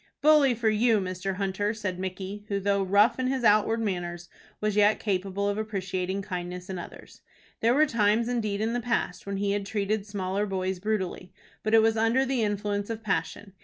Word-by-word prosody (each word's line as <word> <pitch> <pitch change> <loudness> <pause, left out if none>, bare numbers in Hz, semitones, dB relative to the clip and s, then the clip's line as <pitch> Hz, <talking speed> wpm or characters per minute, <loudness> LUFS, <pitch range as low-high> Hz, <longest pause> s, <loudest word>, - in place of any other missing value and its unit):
"Bully 295 -4 +5
for 225 0 -1
you, 220 +1 +3
Mr. 185 0 -3
Hunter!" 200 +2 -1
said 190 -4 -4
Micky, 190 +2 -5
who, 200 -2 -1
though 200 0 +1
rough 200 +6 +3
in 255 - 0
his 260 -1 -1
outward 215 +1 +4
manners, 175 -5 -3 0.3
was 210 -1 -1
yet 210 +1 +4
capable 200 0 -1
of 205 +1 -1
appreciating 190 -2 -3
kindness 180 0 -5
in 185 - -4
others. - - -11 0.4
There 235 +2 +3
were 305 +2 +5
times 230 -3 +2
indeed 215 -4 -1
in 225 +1 0
the 245 - -1
past 225 -6 -2
when 200 0 -2
he 200 0 0
had 205 0 -1
treated 205 +1 -2
smaller 200 0 -2
boys 190 -1 -2
brutally, 190 -3 -3 0.3
but 215 +1 +2
it 220 - +6
was 225 0 +2
under 230 +4 +3
the 260 -2 0
influence 205 -1 -1
of 225 -1 -5
passion. 195 0 -2
205 Hz, 195 wpm, -27 LUFS, 190-220 Hz, 0.4 s, it